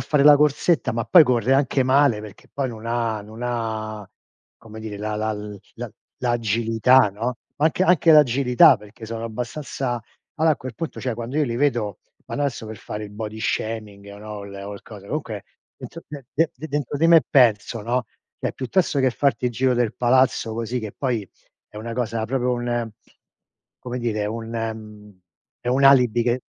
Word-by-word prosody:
fare 145 Hz, -2 st, +1 dB
la 150 Hz, 0 st, +9 dB
corsetta, 150 Hz, +3 st, +2 dB
ma 115 Hz, 0 st, -2 dB
poi 160 Hz, +9 st, +8 dB
corre 125 Hz, -2 st, +2 dB
anche 135 Hz, -1 st, +2 dB
male, 130 Hz, -4 st, +3 dB
perché 105 Hz, -2 st, -12 dB
poi 135 Hz, -2 st, -2 dB
non 115 Hz, -1 st, -8 dB
ha, 115 Hz, -2 st, -1 dB
non 110 Hz, +2 st, -12 dB
ha, 110 Hz, -3 st, -3 dB, 0.5 s
come 110 Hz, 0 st, -12 dB
dire, 110 Hz, -2 st, -6 dB
la 105 Hz, +1 st, -3 dB
la 110 Hz, +1 st, -1 dB, 0.4 s
la -, -, -6 dB, 0.3 s
l'agilità, 115 Hz, +1 st, +3 dB
no, 115 Hz, +5 st, -3 dB, 0.2 s
anche 160 Hz, +5 st, +2 dB
anche 175 Hz, -2 st, +4 dB
l'agilità, 135 Hz, -4 st, +6 dB
perché 105 Hz, +2 st, -12 dB
sono 115 Hz, 0 st, -5 dB
abbastanza 120 Hz, +1 st, -4 dB, 0.4 s
Ala 160 Hz, +1 st, +4 dB
a 150 Hz, -, +2 dB
quel 130 Hz, -2 st, -8 dB
punto, 160 Hz, +7 st, -5 dB
cioè, 125 Hz, -3 st, -2 dB
quando 120 Hz, +4 st, -5 dB
io 155 Hz, -, +3 dB
li 120 Hz, -4 st, -3 dB
vedo, 120 Hz, -7 st, 0 dB, 0.3 s
ma -, -, -6 dB
no -, -, -3 dB
adesso 135 Hz, -5 st, -2 dB
per 110 Hz, 0 st, -7 dB
fare 105 Hz, 0 st, -6 dB
il 105 Hz, -, -11 dB
body 110 Hz, 0 st, -6 dB
shaming 110 Hz, -2 st, -3 dB
o 100 Hz, -, -11 dB
no 105 Hz, +1 st, -10 dB
o -, -, -8 dB
l 100 Hz, 0 st, -8 dB
cosa, 100 Hz, -3 st, -12 dB
comunque 110 Hz, -8 st, -4 dB, 0.3 s
dentro 170 Hz, -, -10 dB
de 145 Hz, -3 st, -9 dB
de 165 Hz, +1 st, +2 dB
de 145 Hz, +5 st, -8 dB
dentro 145 Hz, -2 st, -3 dB
di 165 Hz, -, +4 dB
me 165 Hz, -2 st, +7 dB
penso, 115 Hz, -3 st, +3 dB
no, 120 Hz, +2 st, -1 dB, 0.3 s
cioè, -, -, -2 dB
piuttosto 140 Hz, +4 st, 0 dB
che 130 Hz, -1 st, +3 dB
farti 135 Hz, +2 st, 0 dB
il 125 Hz, -, +1 dB
giro 130 Hz, +2 st, +1 dB
del 120 Hz, -3 st, 0 dB
palazzo 125 Hz, -2 st, +2 dB
così, 115 Hz, +2 st, -3 dB
che 110 Hz, -2 st, -5 dB
poi 120 Hz, -8 st, -3 dB, 0.4 s
è -, -, -15 dB
una 115 Hz, +2 st, -5 dB
cosa 115 Hz, -2 st, -2 dB
proprio, 125 Hz, +1 st, 0 dB
un 120 Hz, -1 st, -2 dB, 0.9 s
come 125 Hz, 0 st, -5 dB
dire, 110 Hz, -3 st, -1 dB
un, 115 Hz, +1 st, -5 dB
ehm, 105 Hz, -3 st, -6 dB, 0.4 s
è -, -, -5 dB
un 135 Hz, +2 st, +2 dB
alibi 125 Hz, -4 st, +5 dB
che 120 Hz, +1 st, +1 dB
120 Hz, 190 wpm, -23 LUFS, 110-130 Hz, 0.9 s, la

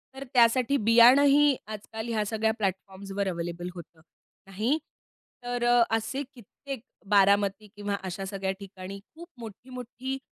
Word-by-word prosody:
तर 270 Hz, -, -6 dB
त्यासाठी 250 Hz, +2 st, +4 dB
बियाणंही 275 Hz, +5 st, +7 dB
आजकाल 220 Hz, +1 st, -7 dB
ह्या 220 Hz, -2 st, 0 dB
सगळ्या 220 Hz, +1 st, 0 dB
प्लॅटफॉर्म्सवर 195 Hz, 0 st, -3 dB
अवेलेबल 175 Hz, 0 st, -4 dB
होतात. 170 Hz, -2 st, -12 dB, 0.5 s
नाही, 215 Hz, +10 st, 0 dB, 0.7 s
तर 245 Hz, 0 st, -3 dB
अ, 240 Hz, 0 st, +5 dB
असे 265 Hz, +5 st, -4 dB
कित्येक 260 Hz, +1 st, -9 dB, 0.3 s
बारामती 200 Hz, +1 st, +3 dB
किंवा 205 Hz, 0 st, -2 dB
अशा 190 Hz, +1 st, -5 dB
सगळ्या 195 Hz, -1 st, -3 dB
ठिकाणी 195 Hz, 0 st, -9 dB
खूप 340 Hz, +2 st, -11 dB
मोठी-मोठी 250 Hz, +4 st, -7 dB
220 Hz, 120 wpm, -27 LUFS, 195-245 Hz, 0.7 s, बियाणंही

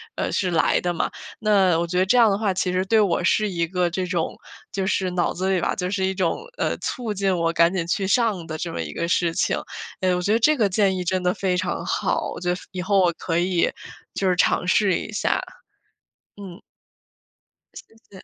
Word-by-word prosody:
呃， -, -, -2 dB
是 185 Hz, -2 st, 0 dB
来 165 Hz, -, +2 dB
的 175 Hz, 0 st, -1 dB
嘛。 165 Hz, -, -1 dB, 0.3 s
那 195 Hz, -5 st, +3 dB
我 170 Hz, -, -1 dB
觉 180 Hz, +1 st, -2 dB
得 185 Hz, -, +3 dB
这 205 Hz, -, +2 dB
样 230 Hz, -2 st, +6 dB
的 195 Hz, -, +1 dB
话， 205 Hz, -2 st, 0 dB
其 185 Hz, 0 st, -1 dB
实 185 Hz, +1 st, 0 dB
对 220 Hz, +3 st, +3 dB
我 180 Hz, -4 st, +1 dB
是 210 Hz, +4 st, +2 dB
一 170 Hz, -3 st, -1 dB
个 180 Hz, 0 st, 0 dB
这 185 Hz, +2 st, -2 dB
种 175 Hz, -2 st, -2 dB, 0.4 s
就 195 Hz, -1 st, -2 dB
是 190 Hz, -1 st, 0 dB
脑 180 Hz, -1 st, 0 dB
子 185 Hz, +2 st, -2 dB
里 185 Hz, -, +2 dB
吧 -, -, 0 dB
就 180 Hz, 0 st, -2 dB
是 190 Hz, -1 st, 0 dB
一 190 Hz, -, 0 dB
种， 185 Hz, -, -1 dB
呃， -, -, -1 dB
促 240 Hz, -4 st, -4 dB
进 195 Hz, -1 st, 0 dB
我 165 Hz, -1 st, +1 dB
赶 170 Hz, +1 st, +4 dB
紧 180 Hz, -3 st, -1 dB
去 190 Hz, +2 st, -1 dB
上 205 Hz, -5 st, +1 dB
的 155 Hz, -1 st, -5 dB
这 170 Hz, +1 st, -4 dB
么 -, -, -4 dB
一 75 Hz, -2 st, -7 dB
个 170 Hz, -, -2 dB
事 170 Hz, -1 st, +1 dB
情。 -, -, 0 dB, 0.4 s
哎， 185 Hz, -1 st, +1 dB
我 180 Hz, -, -1 dB
觉 200 Hz, -, 0 dB
得 225 Hz, -, +3 dB
这 305 Hz, +7 st, +4 dB
个 215 Hz, -5 st, +2 dB
建 195 Hz, 0 st, +2 dB
议 180 Hz, -, -2 dB
真 185 Hz, +1 st, -1 dB
的 180 Hz, 0 st, +2 dB
非 185 Hz, -2 st, -1 dB
常 180 Hz, -1 st, -2 dB
好， -, -, -1 dB
我 -, -, -7 dB
觉 180 Hz, 0 st, -2 dB
得 -, -, -2 dB, 0.2 s
以 185 Hz, -2 st, -4 dB
后 200 Hz, +1 st, +2 dB
我 180 Hz, -2 st, +4 dB
可 165 Hz, 0 st, -3 dB
以 175 Hz, -1 st, +1 dB, 0.4 s
就 190 Hz, -, 0 dB
是 180 Hz, -, +2 dB
尝 180 Hz, -, +2 dB
试 195 Hz, 0 st, +3 dB
一 -, -, -6 dB
下。 210 Hz, -, 0 dB, 1.0 s
嗯。 195 Hz, -2 st, -10 dB, 1.2 s
谢 -, -, -13 dB
谢。 190 Hz, -2 st, -13 dB
185 Hz, 255 characters per minute, -23 LUFS, 175-200 Hz, 1.2 s, 样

